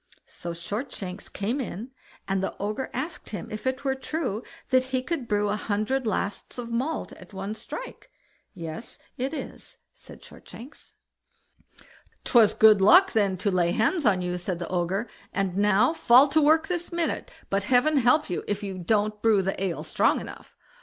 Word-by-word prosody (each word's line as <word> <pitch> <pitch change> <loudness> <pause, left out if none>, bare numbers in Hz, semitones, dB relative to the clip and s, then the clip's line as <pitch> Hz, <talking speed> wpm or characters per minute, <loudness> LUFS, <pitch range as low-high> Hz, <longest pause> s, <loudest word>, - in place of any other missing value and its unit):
So 170 - -9
Shortshanks 190 +1 -5
came 230 +8 -2
in, 235 +1 -6 0.4
and 195 -1 0
the 195 - -3
Ogre 210 +6 -3
asked 330 +2 -5
him 210 - -6
if 215 +4 -5
it 260 +1 -1
were 270 -1 +1
true 265 -5 -3 0.3
that 255 -1 +3
he 260 -1 -2
could 275 -4 -3
brew 205 -1 +1
a 205 - 0
hundred 215 +5 -1
lasts 205 +1 -3
of 235 -1 -6
malt 265 +8 -2
at - - -14
a 195 +2 -4
strike? - - -8 0.5
"Yes 165 +5 -7 0.2
it 260 +2 -1
is", 315 - -8 0.2
said - - -14
Shortshanks. 255 +6 -13 1.3
"Twas 230 -4 +5
good 215 -2 +6
luck 360 - +7
then 200 -4 +1
to 200 +2 0
lay 175 -2 +2
hands 300 +10 +1
on 185 -3 +2
you", 180 0 -2
said 180 0 -3
the 175 - -6
Ogre, 185 +5 -1 0.3
"and 195 -2 -1
now 205 +7 +3
fall 260 -3 +6
to 310 +2 +3
work 315 +2 +4
this 350 -2 -3
minute; 340 -1 -2 0.2
but 195 0 0
heaven 260 +6 +3
help 270 +4 +4
you 180 - -3
if 205 0 -2
you 190 -2 -5
don't 210 +3 0
brew 215 -3 +4
the 195 0 -2
ale 180 -4 -2
strong - - +2
enough." - - -11
215 Hz, 175 wpm, -26 LUFS, 195-265 Hz, 1.3 s, luck